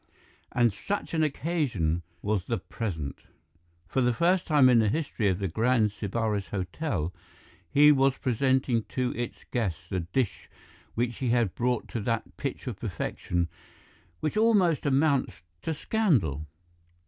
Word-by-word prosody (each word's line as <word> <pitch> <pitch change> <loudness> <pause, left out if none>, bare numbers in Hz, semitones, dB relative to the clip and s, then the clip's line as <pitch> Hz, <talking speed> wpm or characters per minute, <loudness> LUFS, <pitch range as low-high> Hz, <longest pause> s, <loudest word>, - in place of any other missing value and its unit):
And 120 -4 +3
such 200 - -4
an 160 - +2
occasion 140 - 0 0.2
was 105 -3 0
the 115 - -1
present. 90 - -4 0.7
For 130 - 0
the 120 -1 +2
first 180 +6 +2
time 145 -5 +6
in 125 -2 +6
the 110 -2 +3
history 130 -5 -1
of 95 -2 +2
the 100 0 -1
Grand 110 +3 +2
Sybaris 105 -1 -2
Hotel, 90 - -2 0.6
he 150 - +7
was 135 -2 +3
presenting 130 -1 +1
to 125 -1 -1
its 120 -1 -5
guests 105 -10 -1
the 95 - 0
dish 100 +7 -2 0.5
which 120 0 -1
he 130 - -1
had 115 -5 +2
brought 125 -1 0
to 115 - -3
that 115 +1 -2
pitch 140 -2 -4
of 120 -6 -5
perfection 90 -3 -2 0.7
which 155 - -1
almost 195 -10 +3
amounts 140 - +1 0.2
to - - -2
scandal. 135 - +1
120 Hz, 145 wpm, -28 LUFS, 100-140 Hz, 0.7 s, he